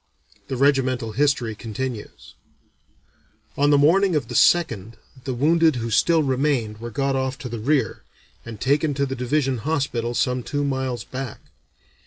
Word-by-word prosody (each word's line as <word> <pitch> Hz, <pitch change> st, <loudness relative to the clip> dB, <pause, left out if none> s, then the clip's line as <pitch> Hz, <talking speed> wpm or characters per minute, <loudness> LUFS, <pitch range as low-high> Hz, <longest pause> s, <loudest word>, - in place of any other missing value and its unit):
The 130 Hz, -, -3 dB
regimental 130 Hz, -4 st, +1 dB
history 130 Hz, -2 st, +1 dB
continues: 115 Hz, +1 st, -6 dB, 1.2 s
"On 145 Hz, +1 st, +2 dB
the 145 Hz, -, +5 dB
morning 175 Hz, +5 st, +4 dB
of 135 Hz, -6 st, -1 dB
the -, -, -5 dB
2nd 115 Hz, -, +2 dB, 0.3 s
the 130 Hz, -, -2 dB
wounded 160 Hz, +3 st, +3 dB
who 115 Hz, -1 st, -3 dB
still 160 Hz, +8 st, +3 dB
remained 130 Hz, -5 st, 0 dB
were 120 Hz, +1 st, -6 dB
got 135 Hz, +3 st, -1 dB
off 130 Hz, 0 st, -2 dB
to 135 Hz, -4 st, -7 dB
the 115 Hz, -1 st, -5 dB
rear, 130 Hz, 0 st, 0 dB, 0.4 s
and 115 Hz, -2 st, -9 dB
taken 145 Hz, +2 st, +1 dB
to 140 Hz, 0 st, +1 dB
the 135 Hz, -1 st, -4 dB
Division 130 Hz, 0 st, 0 dB
Hospital 130 Hz, -4 st, -2 dB
some 125 Hz, 0 st, 0 dB
two 145 Hz, +4 st, -3 dB
miles 130 Hz, -4 st, -2 dB
back. 130 Hz, 0 st, -7 dB
130 Hz, 155 wpm, -23 LUFS, 120-145 Hz, 1.2 s, the